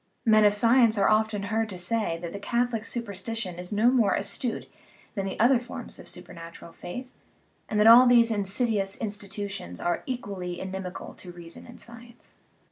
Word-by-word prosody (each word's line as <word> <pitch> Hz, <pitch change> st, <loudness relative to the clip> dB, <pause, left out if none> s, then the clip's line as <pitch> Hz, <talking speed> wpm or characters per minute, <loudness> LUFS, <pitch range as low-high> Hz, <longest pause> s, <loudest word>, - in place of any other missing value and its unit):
Men 215 Hz, -2 st, +5 dB
of 205 Hz, -, +5 dB
sci 230 Hz, +4 st, +4 dB
ence 225 Hz, -2 st, +4 dB
are 200 Hz, -, +3 dB
often 215 Hz, -1 st, +1 dB
heard 220 Hz, +1 st, -1 dB
to 185 Hz, -, -5 dB
say 180 Hz, -1 st, -1 dB
that 170 Hz, -, -5 dB
the 200 Hz, -, -5 dB
Catholic 235 Hz, +2 st, -1 dB
supersti 225 Hz, -1 st, -4 dB
tion 180 Hz, -6 st, -4 dB
is 180 Hz, 0 st, -3 dB
no 220 Hz, +4 st, +3 dB
more 230 Hz, -7 st, +3 dB
astute 200 Hz, +4 st, -2 dB, 0.5 s
than 195 Hz, -3 st, -3 dB
the 190 Hz, -, -6 dB
other 240 Hz, +3 st, +5 dB
forms 240 Hz, -1 st, -6 dB
of -, -, -11 dB
supernat 170 Hz, -2 st, -8 dB
ural 170 Hz, -, -13 dB
faith, 215 Hz, +9 st, -7 dB, 0.6 s
and 210 Hz, -, 0 dB
that 210 Hz, -, +5 dB
all 240 Hz, +3 st, +9 dB
these 235 Hz, -1 st, +5 dB
insiduous 205 Hz, -1 st, 0 dB
institutions 200 Hz, -, -5 dB
are 175 Hz, 0 st, -1 dB
equally 195 Hz, -8 st, -5 dB
inimical 190 Hz, -1 st, -6 dB
to 180 Hz, -, -11 dB
reason 170 Hz, -1 st, -9 dB
and 240 Hz, -, -13 dB
science. 235 Hz, +1 st, -13 dB
210 Hz, 185 wpm, -27 LUFS, 190-230 Hz, 0.6 s, all